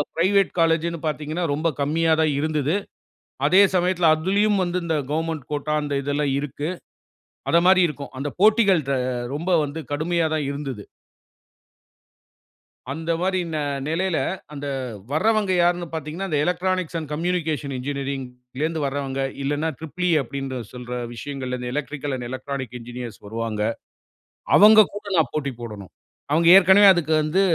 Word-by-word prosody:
Private 195 +3 +3
காலேஜ்னு 165 0 +1
பார்த்தீங்கனா, 155 +3 -3
ரொம்ப 155 +3 0
கம்மியா 160 +3 +1
தான் 155 -1 +2
இருந்துது. 155 +1 0 0.7
அதே 190 +2 +6
சமயத்தில 180 -2 +3
அதிலயும் 200 +5 +1
வந்து 175 0 -1
இந்த 165 -1 0 0.2
கவர்ன்மென்ட் 160 -2 -2
கோட்டா 150 +1 -2
அந்த 145 -1 -3
இதெல்லாம் 145 0 0
இருக்கு. 145 +2 -4 0.8
அத 170 - +4
மாரி 185 0 +6
இருக்கும். 145 -3 -7
அந்த 145 +2 -2
போட்டிகள் 210 -5 +5
ர - - +2 0.4
ரொம்ப 165 +5 -3 0.2
வந்து 145 +3 -6
கடுமையா 165 +2 0
தான் 150 -2 -1
இருந்துது. 140 -6 -5 2.1
அந்த 165 +4 -3
மாரி 185 0 +1
ந - - -1 0.3
நிலையில, 170 +2 0 0.4
அந்த 145 0 -6 0.4
வர்றவங்க 210 +5 +2
யாருனு 175 0 +2
பார்த்தீங்கன்னா, 160 +5 -4
அந்த 155 - 0
எலக்ட்ரானிக்ஸ் 180 -1 -1
அண்ட் 155 -3 -6
கம்யூனிகேஷன் 160 -4 -2
என்ஜினியரிங்ல 130 -2 -5
இருந்து 160 -1 -2
வர்றவங்க 135 -1 -2 0.2
இல்லனா 145 +3 -1
ட்ரிப்பிள் 160 +3 -4
இ - - +3
அப்படினு 135 0 -5
சொல்ற 125 -1 -9 0.2
விஷயங்கல் 125 -1 -5
எலக்ட்ரிக்கல் 145 -1 -3
அண்ட் 120 -1 -6
எலக்ட்ரானிக் 130 -1 -5
என்ஜினியர்ஸ் 120 -1 -8
வருவாங்க. 110 0 -3 1.0
அவங்க 215 -1 +8
கூட 205 - -7
நான் 160 -3 +2
போட்டி 140 -3 -2
போடணும். 105 -5 -8 0.4
அவங்க 165 +3 +3
ஏற்கனவே 195 +2 +7
அதுக்கு 165 -3 -2
வந்து 155 +5 +1
155 Hz, 135 wpm, -23 LUFS, 140-175 Hz, 2.1 s, அவங்க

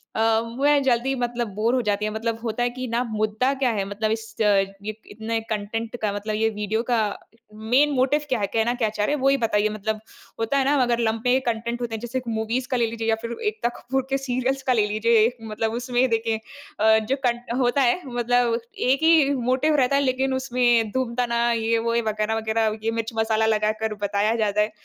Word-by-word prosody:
अ, 225 0 +3 0.2
मैं 290 0 +4
जल्दी 260 +1 +1
मतलब 240 -1 -1
बोर 220 +3 +1
हो 255 - +2
जाती 205 0 +1
है 215 - -2
मतलब 225 +1 -2
होता 230 +1 -1
है 245 - +1
कि 255 +1 -6
ना, 235 +1 0
मुद्दा 220 +3 0
क्या 265 -2 0
है? 205 -3 -1
मतलब 210 +2 -2
इस 225 0 -4
अ, - - +4 0.4
ये 215 +1 -5 0.2
इतने 225 +2 -3
कंटेंट 220 +2 -3
का 210 -2 0
मतलब 210 +1 -3
ये 225 +1 +2
वीडियो 215 +1 -2
का 240 -2 +3 0.5
मेन 245 +7 +2
मोटिव 270 +3 +2
क्या 255 -3 +1
है? 200 - 0
कहना 230 +1 +2
क्या 245 -3 0
चाह 210 -1 -1
रहे 290 - +1
हैं 290 - -5
वो 270 - +4
ही 275 - +4
बताइए 215 -3 +1
मतलब 215 +1 -3 0.4
होता 225 +5 0
है 270 - +2
ना, 285 +2 +3
अगर 240 -1 +1
लम्बे 230 +3 +1
कंटेंट 235 +1 -2
होते 235 -2 -3
हैं - - -5
जैसे 240 +2 -3
कि 240 -2 -6
मूवीज़ 225 +3 -2
का 255 - +2
ले 235 - +2
लीजिए 225 0 -4
या 225 - +4
फिर 235 0 -4
एकता 420 - -1
कपूर 265 +1 -2
के 270 - +1
सीरियल्स 265 0 -1
का 255 - +2
ले 215 -3 +3
लीजिए 220 +2 +2
एक 245 +2 -2
मतलब 220 +1 -1
उसमें 245 +2 0
देखिए 225 -1 0 0.4
अ, 220 +1 +5
जो 270 - +3
कन 240 -1 +1 0.2
होता 250 +2 +2
है 255 +7 +2
मतलब 245 -1 +1 0.3
एक 275 +4 +2
ही 320 -4 +5
मोटिव 260 +5 +1
रहता 275 -1 +3
है 280 - +3
लेकिन 265 0 0
उसमें 245 -4 +2
धूमताना 240 -1 0
ये-वो 230 0 0
ये 235 - +2
वगैरह-वगैरह 220 0 -1
ये 225 - +1
मिर्च-मसाला 225 -1 0
लगाकर 215 0 0
बताया 205 +2 +1
जाता 210 -2 +1
है। 210 +1 0
230 Hz, 215 wpm, -24 LUFS, 220-250 Hz, 0.5 s, अ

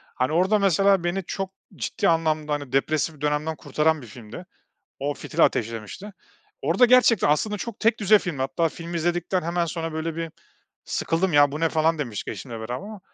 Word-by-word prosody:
Hani, 130 +3 0
orada, 185 +6 +3
mesela, 195 0 +3
beni 175 +2 -1
çok 190 +2 -4 0.2
ciddi 130 +4 -1
anlamda, 155 -2 +1
hani, 145 -3 -4
depresif 150 +2 0
dönemden 150 +2 -1
kurtaran 155 0 0
bir 120 - -11
filmdi. 115 - -10 0.5
O 145 +2 -1
fitili 145 -1 -3
ateşlemişti. 115 - -2 0.5
Orada 245 - +4
gerçekten, 245 -8 +5
aslında, 210 +8 +1
çok 230 +1 -6
tekdüze 215 -2 +4
filmdi. 165 -9 -4
Hatta 160 +5 0
filmi 170 +2 -6
izledikten 175 +2 0
hemen 170 +1 -1
sonra 165 -1 -4
böyle 160 0 -3
bir 165 -1 -4 0.5
sıkıldım, 170 +2 -1
"Ya, 145 -1 +5
bu 150 - -4
ne?" 165 - +3
falan 160 0 +1
demiştik 120 -8 -4
eşimle 125 -4 -6
beraber 115 +3 -4
ama, 205 +10 -8
165 Hz, 175 wpm, -24 LUFS, 145-185 Hz, 0.5 s, gerçekten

